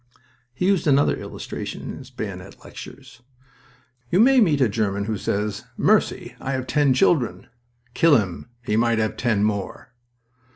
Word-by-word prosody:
He 130 +9 -3
used 195 -4 +2
another 140 0 +4
illustration - - -7
in - - -6
his - - -12
bayonet - - -8
lectures. 120 - -12 0.9
"You 180 - +2
may 260 +4 +6
meet 155 -9 +3
a 130 - +4
German 100 -2 -1
who 110 0 -2
says, 105 +1 -3
'Mercy! - - +1
I 135 - -3
have 130 -1 -2
ten 145 -2 +2
children.'... 120 - +2 0.5
Kill 160 -1 +5
him! 100 +2 -4
He 105 - -1
might 115 0 +2
have 110 -1 0
ten 110 -5 0
more." 105 +2 -3
120 Hz, 155 wpm, -23 LUFS, 105-145 Hz, 0.9 s, may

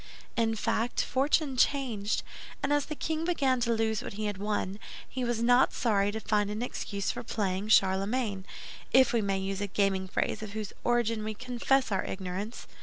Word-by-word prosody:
In 225 -1 +1
fact, 230 +2 0
fortune 275 +1 +1
changed; 240 -7 +1 0.4
and 275 +1 +2
as 290 -1 +2
the 305 - -4
king 315 +2 -2
began 275 -7 +2
to 235 -1 +1
lose 220 -1 +1
what - - -6
he 215 +1 -3
had 205 -2 -3
won, 205 -1 -2 0.3
he 255 - -4
was 235 -1 0
not 245 +2 +5
sorry 205 -4 +2
to 220 - -4
find 210 -1 +1
an 210 +3 -3
excuse 200 -5 -3
for - - -6
playing 200 -3 -2
Charlemagne—if 205 +4 +2
we 230 - +3
may 195 -1 0
use 195 +1 -3
a 205 - -1
gaming 195 -1 +1
phrase 185 - -1
of 210 -2 -6
whose 215 -2 -5
origin 230 -2 +1
we 215 0 -3
confess 250 +2 +1
our 195 - +1
ignorance. 190 +4 -5
220 Hz, 180 wpm, -29 LUFS, 200-245 Hz, 0.4 s, not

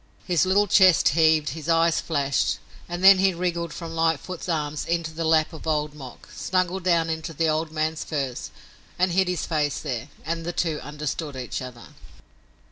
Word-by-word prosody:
His 175 -2 +2
little 200 +2 +4
chest 185 -3 +5
heaved, 155 0 +3
his 155 +3 -6
eyes 165 0 +3
flashed, 140 -4 0 0.3
and 175 +1 -4
then 195 0 +9
he 190 -1 +3
wriggled 170 -2 -2
from 165 0 -7
Lightfoot's 165 +2 -1
arms 150 -2 -2
into 170 -1 -1
the 165 +1 -3
lap 160 +1 +2
of 160 - -9
Old 150 -1 0
Mok, 135 -4 -11
snuggled 185 0 -1
down 170 -2 +2
into 160 0 -4
the 165 +2 0
old 155 +1 0
man's 155 0 -2
furs 135 -5 -4 0.5
and 185 0 +2
hid 190 +1 +2
his 180 -2 -2
face 150 -3 -1
there; 135 -1 -5 0.2
and 165 +1 -3
the 175 +1 -4
two 160 -4 -1
understood 150 0 -5
each 130 +1 -5
other. 125 -2 -9
160 Hz, 180 wpm, -24 LUFS, 150-175 Hz, 0.5 s, then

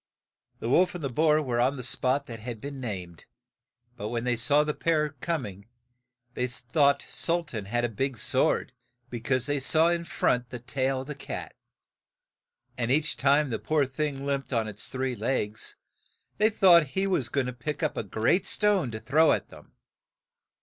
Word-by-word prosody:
The - - -5
wolf 180 +9 +3
and 175 - -6
the 135 - -2
boar 155 +2 +3
were 120 -3 -1
on 135 +3 +1
the 125 - -6
spot 130 +3 +1
that 115 -3 -8
had 115 0 -6
been 140 +3 -7
named, 90 -8 -6 0.7
but 105 - -5
when 115 -1 -2
they 125 -1 +1
saw 145 +6 +4
the 150 0 -2
pair 155 -2 +1
coming, 130 - -5 0.7
they 125 +1 -1
thought 140 +4 +2
Sul 170 +1 0
tan 110 -10 -6
had 120 +4 -1
a - - +2
big 130 +3 -3
sword, 130 +4 +1 0.4
be 120 - -4
cause 130 +2 0
they 145 0 0
saw 160 +5 +4
in 170 -1 -1
front 125 -6 0
the 125 - -6
tail 130 +2 -1
of 130 - -10
the 150 - -4
cat, 140 - -7 1.2
and 120 -1 -1
each 155 +4 +1
time 140 0 +2
the 110 - -2
poor 155 -2 +1
thing 140 0 -3
limped 140 -1 -2
on 115 -3 0
its 105 -1 -6
three 130 -1 -2
legs, 110 -1 -2 0.6
they 215 +1 +5
thought 185 -6 +6
he 190 - +2
was 160 -11 0
go 140 - +1
ing - - -3
to 125 - -4
pick 150 +6 -5
up 155 - 0
a - - -1
great 115 - +1
stone 205 - +3
to 110 -1 -6
throw 155 +7 +3
at - - -3
them. - - -16
135 Hz, 190 wpm, -27 LUFS, 120-150 Hz, 1.2 s, thought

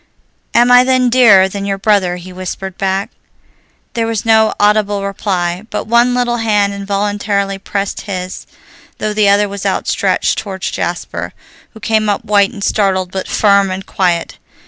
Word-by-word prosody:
"Am 240 +1 +5
I 245 0 +7
then 255 -1 +2
dearer 215 -7 +6
than 195 +1 -6
your 200 0 -2
brother?" 195 -3 +1
he 180 +1 -10
whispered 185 0 -6
back. 195 0 -2 0.8
There 230 -2 -1
was 225 -1 -3
no 220 -1 +4
audible 205 -1 +2
reply, 185 -1 -2
but - - -4
one 235 +2 +3
little 240 -1 0
hand 210 -3 +1
involuntarily 200 0 -2
pressed 200 0 -3
his, 185 -2 -6 0.5
though 215 0 -2
the 210 -1 +3
other 205 +1 +3
was 200 0 -7
outstretched - - 0
toward 190 -3 -7
Jasper, - - -4 0.4
who - - -11
came 220 -1 0
up 205 - -2
white 200 -1 +3
and 205 -5 -8
startled 190 -4 0
but 190 0 -4
firm 200 -2 +3
and 185 +1 -5
quiet. 175 -3 -1
200 Hz, 160 wpm, -15 LUFS, 195-220 Hz, 0.8 s, I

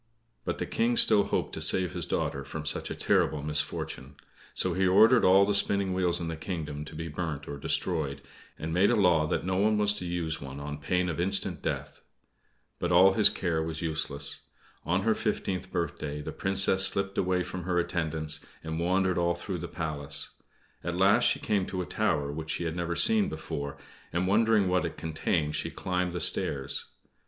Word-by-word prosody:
But - - -2
the - - -3
King 120 +1 0
still 105 -2 +5
hoped - - -2
to - - -4
save 90 -3 +3
his - - -4
daughter 70 - -2
from 75 +3 -7
such 80 - -2
a - - -4
terrible 75 -2 +1
misfortune. 75 -2 -3 0.4
So 90 - 0
he 95 +2 +1
ordered 110 +6 +6
all 95 +2 +6
the 105 - 0
spinning 100 -1 +1
wheels 90 -2 +3
in 85 - -4
his 80 -1 -5
kingdom 75 -5 -5
to 75 - -11
be 80 +1 -5
burnt 80 -2 -5
or 70 - -5
destroyed, 75 -2 -1 0.3
and 80 +1 -4
made 95 +4 +4
a 120 - +3
law 90 -7 +3
that 75 - -2
no 95 0 -1
one 105 +2 +2
was 105 -1 +3
to 90 - -5
use 85 -2 -3
one 70 0 -8
on 75 +1 -6
pain 90 +5 0
of 85 -1 -3
instant 95 -2 +1
death. - - -4 0.8
But - - -1
all 95 +2 +6
his 105 0 +7
care 85 -5 -1
was 80 +1 -4
useless. 75 -3 -2 0.5
On 90 +3 0
her 110 +1 +3
fifteenth 95 -4 -3
birthday 75 -4 -3
the 75 - -6
Princess 95 0 +3
slipped 100 0 0
away 90 -1 +1
from 90 0 -6
her 90 -1 0
attendants, 80 -3 -1 0.2
and 80 0 -4
wandered 95 +1 +1
all 85 0 +1
through 90 +1 -5
the 85 - -5
Palace. 75 -5 -3 0.5
At 85 +1 -3
last 95 +2 +4
she - - +3
came 100 -3 0
to 95 - -3
a - - -7
tower 70 -3 -1
which 80 +1 -6
she - - -2
had 80 -1 -3
never 85 -1 -2
seen 215 - +4
before, 70 -1 -5 0.3
and, 90 +2 0
wondering 105 0 +3
what 90 0 +1
it 85 - -5
contained, 80 -1 -1
she - - -2
climbed 90 -1 -2
the 90 - -3
stairs. 70 0 +1
85 Hz, 200 wpm, -28 LUFS, 80-95 Hz, 0.8 s, his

